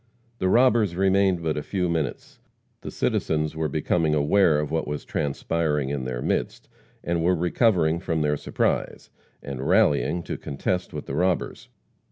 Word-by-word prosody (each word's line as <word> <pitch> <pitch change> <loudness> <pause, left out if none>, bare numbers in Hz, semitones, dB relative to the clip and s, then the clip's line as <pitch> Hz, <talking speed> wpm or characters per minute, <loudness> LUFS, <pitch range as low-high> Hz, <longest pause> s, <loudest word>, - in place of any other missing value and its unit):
The 95 - +1
robbers 115 -5 +3
remained 95 -2 +2
but 80 -2 -1
a - - -1
few 90 +3 -2
minutes. 80 -6 -3 0.4
The - - -6
citizens 75 0 -1
were 80 0 -1
becoming 80 +2 +1
aware 75 +1 +3
of 75 -1 -3
what 80 -1 -1
was 75 0 -4
transpiring 75 0 -1
in 70 -2 -3
their 60 -1 -4
midst, - - -2 0.4
and 85 -1 -1
were 90 +2 +3
recovering 85 -2 +2
from 80 -3 -1
their 75 0 +1
surprise, - - -2 0.3
and 70 -2 -6
rallying 75 +3 +2
to - - -5
contest 90 +6 -3
with - - -6
the - - -6
robbers. 90 +4 -1
80 Hz, 160 wpm, -24 LUFS, 75-90 Hz, 0.4 s, robbers